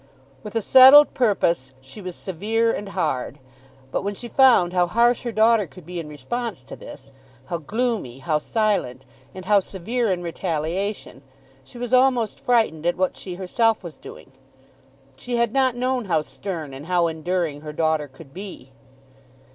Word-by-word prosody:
With 210 Hz, -, -9 dB
a 225 Hz, -, 0 dB
settled 265 Hz, +5 st, +8 dB
purpose 170 Hz, -, +1 dB
she 135 Hz, +10 st, -12 dB
was 180 Hz, -2 st, -7 dB
severe 220 Hz, +6 st, -1 dB
and 205 Hz, -1 st, -5 dB
hard. 145 Hz, -8 st, -2 dB, 0.5 s
But -, -, -1 dB
when 200 Hz, +1 st, -3 dB
she 240 Hz, -, -8 dB
found 235 Hz, -9 st, +4 dB
how 180 Hz, -1 st, +2 dB
harsh 235 Hz, +5 st, +2 dB
her 240 Hz, -, -4 dB
daughter 220 Hz, -2 st, +3 dB
could 165 Hz, +3 st, -15 dB
be 175 Hz, +1 st, -6 dB
in 155 Hz, -2 st, -7 dB
response 180 Hz, -, -5 dB
to -, -, -10 dB
this, 135 Hz, -, -12 dB, 0.3 s
how 170 Hz, +5 st, -4 dB
gloomy, 210 Hz, -, -2 dB
how 150 Hz, +2 st, -1 dB
silent, 195 Hz, -, -1 dB, 0.3 s
and 185 Hz, -1 st, -8 dB
how 205 Hz, +1 st, +5 dB
severe 205 Hz, +5 st, -2 dB
in 175 Hz, -1 st, -2 dB
retaliation, 170 Hz, 0 st, -3 dB, 0.4 s
she 135 Hz, -, -15 dB
was 245 Hz, 0 st, -5 dB
almost 255 Hz, -4 st, +3 dB
frightened 220 Hz, -10 st, +1 dB
at 175 Hz, -, 0 dB
what 185 Hz, 0 st, 0 dB
she 180 Hz, -2 st, -7 dB
herself 220 Hz, +4 st, 0 dB
was 170 Hz, -3 st, -9 dB
doing. -, -, -12 dB, 0.9 s
She 245 Hz, -, -4 dB
had 235 Hz, -1 st, +1 dB
not 260 Hz, -2 st, +2 dB
known 250 Hz, -1 st, -1 dB
how 165 Hz, -5 st, +1 dB
stern 160 Hz, -6 st, -6 dB
and 140 Hz, +4 st, -9 dB
how 180 Hz, -1 st, +2 dB
enduring 165 Hz, -2 st, -2 dB
her 150 Hz, 0 st, -7 dB
daughter 155 Hz, -1 st, 0 dB
could 135 Hz, +1 st, -16 dB
be. 185 Hz, -8 st, -9 dB
185 Hz, 170 wpm, -23 LUFS, 160-230 Hz, 0.9 s, settled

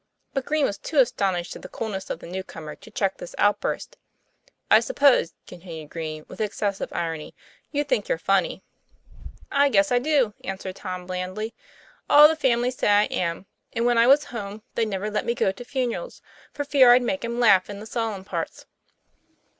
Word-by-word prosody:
But 270 Hz, -2 st, -2 dB
Green 305 Hz, -2 st, +2 dB
was 200 Hz, -, -3 dB
too 310 Hz, -, -5 dB
astonished 195 Hz, -9 st, +1 dB
at -, -, -10 dB
the -, -, -9 dB
coolness 195 Hz, -4 st, -5 dB
of -, -, -3 dB
the -, -, -12 dB
new 185 Hz, +2 st, -5 dB
comer 155 Hz, -4 st, -9 dB
to -, -, -15 dB
check 195 Hz, -3 st, -1 dB
this -, -, -9 dB
outburst. 210 Hz, -, 0 dB, 0.7 s
'I -, -, +9 dB
suppose," 280 Hz, -, +3 dB
continued 165 Hz, -4 st, -10 dB
Green, 155 Hz, -2 st, -5 dB
with -, -, -8 dB
excessive 205 Hz, -2 st, -2 dB
irony, 165 Hz, -2 st, -4 dB, 0.4 s
"you 290 Hz, 0 st, 0 dB
think -, -, -1 dB
you're -, -, +1 dB
funny?" -, -, 0 dB, 0.9 s
"I 280 Hz, 0 st, +4 dB
guess 295 Hz, 0 st, +3 dB
I 245 Hz, -, +4 dB
do, 265 Hz, -5 st, +2 dB
"answered 190 Hz, -1 st, -5 dB
Tom 185 Hz, -2 st, -6 dB
blandly. 185 Hz, +5 st, -4 dB, 0.6 s
"All 295 Hz, +1 st, +9 dB
the 320 Hz, -, 0 dB
family 250 Hz, -4 st, +1 dB
say 255 Hz, -, -2 dB
I 205 Hz, 0 st, +5 dB
am; 170 Hz, +1 st, -2 dB, 0.3 s
and 230 Hz, +1 st, 0 dB
when 240 Hz, -1 st, +3 dB
I 230 Hz, -, +5 dB
was 280 Hz, +3 st, +6 dB
home 215 Hz, -6 st, -7 dB
they'd 225 Hz, -, 0 dB
never 205 Hz, +1 st, -3 dB
let 210 Hz, -, -1 dB
me 235 Hz, -, -1 dB
go 195 Hz, -, +2 dB
to 195 Hz, +6 st, -10 dB
funerals, 260 Hz, -, -3 dB, 0.3 s
for 290 Hz, -, -3 dB
fear 275 Hz, -3 st, +6 dB
I'd 250 Hz, 0 st, +4 dB
make 280 Hz, +4 st, -2 dB
'em 235 Hz, +1 st, -3 dB
laugh 200 Hz, -6 st, +5 dB
in 200 Hz, -1 st, -6 dB
the 215 Hz, -, -9 dB
solemn 220 Hz, -4 st, -3 dB
parts." -, -, -5 dB
220 Hz, 190 wpm, -24 LUFS, 190-260 Hz, 0.9 s, I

